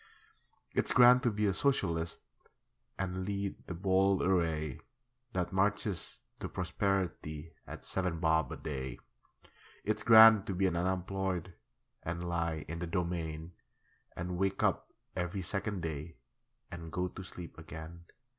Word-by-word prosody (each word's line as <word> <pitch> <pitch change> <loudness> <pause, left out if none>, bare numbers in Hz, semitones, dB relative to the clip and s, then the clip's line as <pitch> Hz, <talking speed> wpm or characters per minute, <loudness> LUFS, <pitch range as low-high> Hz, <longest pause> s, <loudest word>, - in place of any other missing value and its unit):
It's - - +1
grand 125 0 +8
to 120 - +2
be 105 -1 0
a 100 - +3
Socialist 85 - 0 0.8
And 95 -1 -2
lead 100 0 -3
the 90 - -4
bold 95 +1 +3
array 80 -6 +1 0.5
That 90 0 -1
marches 100 -1 0 0.2
to - - -4
prosperity 90 -4 -2
At - - -8
seven 90 -3 -1
bob 80 -1 +2
a - - -5
day. 65 -4 -4 0.9
It's 110 - -1
grand 110 -3 +9
to 95 - -2
be 95 +2 +2
an 90 - +1
unemployed 95 0 -1 0.5
And 85 +1 -4
lie 85 -3 -1
in 85 +2 -5
the 90 - -3
Domain, 85 -2 -2 0.6
And 90 +1 -4
wake 95 0 0
up - - +1 0.2
every 90 +2 -2
second 100 0 -2
day 80 0 -4 0.6
And 80 -2 -7
go 90 +2 -1
to 95 - -9
sleep 90 -2 -9
again. 80 +1 -9
90 Hz, 135 wpm, -33 LUFS, 85-95 Hz, 0.9 s, grand